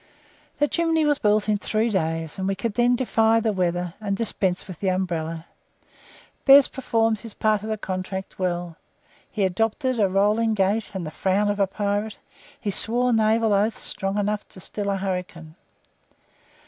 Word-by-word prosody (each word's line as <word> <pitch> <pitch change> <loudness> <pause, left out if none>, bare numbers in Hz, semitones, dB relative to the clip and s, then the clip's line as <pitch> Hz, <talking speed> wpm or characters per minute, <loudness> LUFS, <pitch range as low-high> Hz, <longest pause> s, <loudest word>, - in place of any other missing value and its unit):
The 295 - +2
chimney 325 0 +1
was 295 -1 +2
built 210 0 +2
in 210 -1 +1
three 220 +2 0
days, 165 -3 -2
and 190 - -1
we 195 - 0
could 225 +2 -3
then 245 +2 +3
defy 225 -3 +2
the 220 -1 0
weather, 175 -2 -1
and 200 -2 -2
dispense 190 -5 -1
with 185 -5 -9
the 195 - -2
umbrella. 165 -3 -2 1.0
Bez 275 0 +8
performed 225 -4 0
his 225 -2 -10
part 215 -2 +1
of 215 - -6
the 215 - -1
contract 190 -1 -5
well. 175 -2 -2 0.5
He 210 - -2
adopted 225 +7 0
a 200 -2 +3
rolling 210 +4 +2
gait 205 +2 +1
and 185 -3 -3
the 155 - -6
frown 200 +4 +1
of 205 - -4
a 195 - +3
pirate; 205 +2 -2 0.4
he 205 - -2
swore 245 +5 +2
naval 220 0 +3
oaths 210 +3 +1
strong 195 +1 -2
enough 210 0 -1
to - - -12
still 200 +2 -4
a 195 - 0
hurricane. 180 -4 -5
205 Hz, 175 wpm, -24 LUFS, 185-225 Hz, 1.0 s, Bez